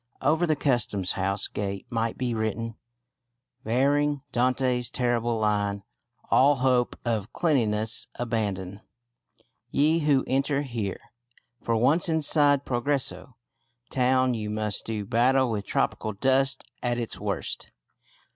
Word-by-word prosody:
Over 160 +5 +2
the 155 - +2
Customs 120 -9 +1
House 95 +1 -1
gate 100 -1 -4
might 115 -1 -1
be 125 -2 -1
written, 115 +1 -2 0.9
varying 140 +4 +1
Dante's 125 -1 +1
terrible 120 -2 0
line, 100 -2 0 0.5
"All 140 +2 +5
hope 125 -2 +1
of 110 -4 -1
cleanliness 110 -8 +1
abandon, 100 -5 -3 0.9
ye 155 +3 +3
who 145 -4 +2
enter 135 +2 0
here": 115 -7 -4 0.6
for 115 - 0
once 145 +10 +3
inside 145 -3 +3
Progreso 125 0 -1 0.6
town 130 0 +2
you 110 -2 -3
must 105 -1 -1
do 110 -2 -3
battle 125 +4 +2
with 105 -2 -3
tropical 110 - -1
dust 135 +5 +1 0.2
at 120 -1 0
its 115 -2 -4
worst. - - -3
120 Hz, 120 wpm, -26 LUFS, 110-135 Hz, 0.9 s, All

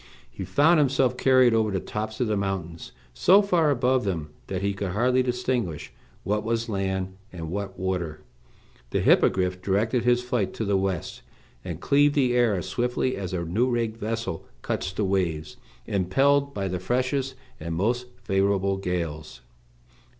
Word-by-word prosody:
He 95 - -6
found 150 - +4
himself 135 -3 +2
carried 130 -2 +4
over 110 -1 +2
the 95 -2 -1
tops 110 +3 -5
of 125 - +2
the 110 -2 0
mountains, 95 -4 -4 0.2
so 195 - +5
far 175 -6 +2
above 130 -1 +2
them 80 -7 -3 0.2
that 95 0 -3
he 100 0 +1
could 95 -2 -4
hardly 125 +5 +3
distinguish 125 -8 -2 0.3
what 105 +2 0
was 115 +1 -1
land 95 -2 -2 0.2
and 80 -3 -6
what 95 0 -4
water. 90 -5 -3 0.7
The - - 0
Hippogriff 90 -1 +3
directed 110 +6 +1
his 125 0 +3
flight 125 -5 -1
to 110 - -2
the 100 0 +1
west, 95 -3 -2 0.4
and 85 -3 -5
cleaved 145 +7 +3
the 130 -4 +3
air 120 -4 +3
as 90 0 -4
swiftly 125 +5 -1
as 95 -3 -5
a 85 -2 -2
new 110 +10 +1
rigged 115 -2 -1
vessel 115 -5 -3 0.2
cuts 95 - -2
the 100 +2 -1
waves, 90 -5 -1 0.3
impelled 140 +10 +2
by 100 -6 -3
the 90 -1 -3
freshest 130 +6 -1 0.2
and 80 +1 -4
most 120 +7 0 0.2
favorable 95 0 +1
gales. 85 -7 -4
100 Hz, 165 wpm, -25 LUFS, 95-125 Hz, 0.7 s, so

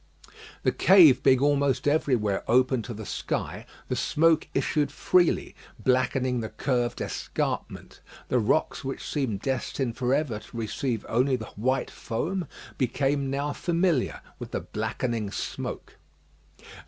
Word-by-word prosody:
The - - +3
cave 180 -8 +7
being 130 -1 +4
almost 140 -2 +2
everywhere 125 -9 +1
open 130 +1 +3
to 120 +1 -6
the 110 0 -7
sky, - - -4 0.2
the - - -1
smoke 165 +1 +2
issued 145 -2 +1
freely, 175 +3 +2 0.2
blackening 130 0 +1
the 110 -1 -4
curved 125 -3 -1
escarpment. - - -4 0.3
The 125 - +2
rocks 120 +8 +1
which 135 0 -5
seemed 125 -9 -2
destined 130 -1 -2
for 125 -2 0
ever 140 -8 -1
to 115 - -12
receive 115 +1 -2
only 130 +3 +2
the 110 -4 -7
white 130 +5 0
foam, 170 +9 -3 0.3
became 135 +2 0
now 140 +2 -1
familiar 170 -5 0 0.2
with - - -7
the - - -3
blackening 115 -5 -3
smoke. - - -5
130 Hz, 130 wpm, -27 LUFS, 120-145 Hz, 0.3 s, cave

